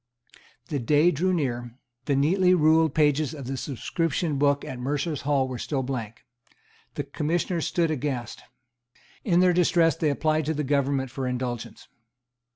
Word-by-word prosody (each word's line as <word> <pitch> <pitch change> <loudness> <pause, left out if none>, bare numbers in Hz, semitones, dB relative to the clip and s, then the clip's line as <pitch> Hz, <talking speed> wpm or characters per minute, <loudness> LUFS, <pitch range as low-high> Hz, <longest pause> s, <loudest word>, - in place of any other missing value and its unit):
The 145 - -1
day 150 +7 +3
drew 180 +5 0
near. 120 -7 -2 0.3
The 140 - +1
neatly 180 +6 +3
ruled 160 -2 +3
pages 150 0 +2
of 140 -3 -8
the 135 +2 -3
subscription 145 +3 -2
book 145 0 +2
at 125 - -6
Mercers' 145 +4 -2
Hall 135 -2 +2
were 130 -2 -6
still 135 -3 -2
blank. 120 -4 -5 0.7
The 145 - -2
Commissioners 160 +4 -2
stood 165 -2 +1
aghast. 130 -5 -3 0.8
In 180 -3 +3
their 180 -1 +4
distress 170 -1 +3
they 155 - 0
applied 155 +1 0
to 160 - 0
the 150 - -1
government 140 -2 0
for 130 0 -3
indulgence. 125 -2 -5
145 Hz, 155 wpm, -25 LUFS, 130-160 Hz, 0.8 s, their